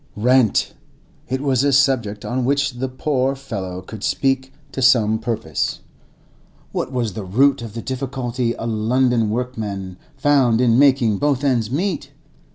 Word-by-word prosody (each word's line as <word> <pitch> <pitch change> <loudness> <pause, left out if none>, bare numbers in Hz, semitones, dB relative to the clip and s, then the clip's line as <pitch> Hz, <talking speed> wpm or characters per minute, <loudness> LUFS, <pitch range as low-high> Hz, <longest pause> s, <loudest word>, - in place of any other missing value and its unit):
Rent!—it 125 +2 -1
was 135 -3 +1
a 140 - +3
subject 130 -7 +1
on 125 +1 -1
which 140 -1 0
the 130 +1 -2
poor 135 0 -1
fellow 95 -9 -6
could 105 +2 -9
speak 135 -1 0 0.2
to 135 - -4
some 115 -4 +4
purpose. 110 - -2 0.9
What 130 - -3
was 120 -6 -2
the 105 - -5
root 130 +8 +2
of 115 -2 -8
the 115 - -5
difficulty 125 -2 -3
a - - -6
London 115 +1 +1
workman 105 -6 -4 0.2
found 135 -6 +3
in 120 -1 +4
making 130 -7 +4
both 145 -2 +1
ends 120 -6 +1
meet? 165 +5 -2
125 Hz, 145 wpm, -20 LUFS, 110-135 Hz, 0.9 s, some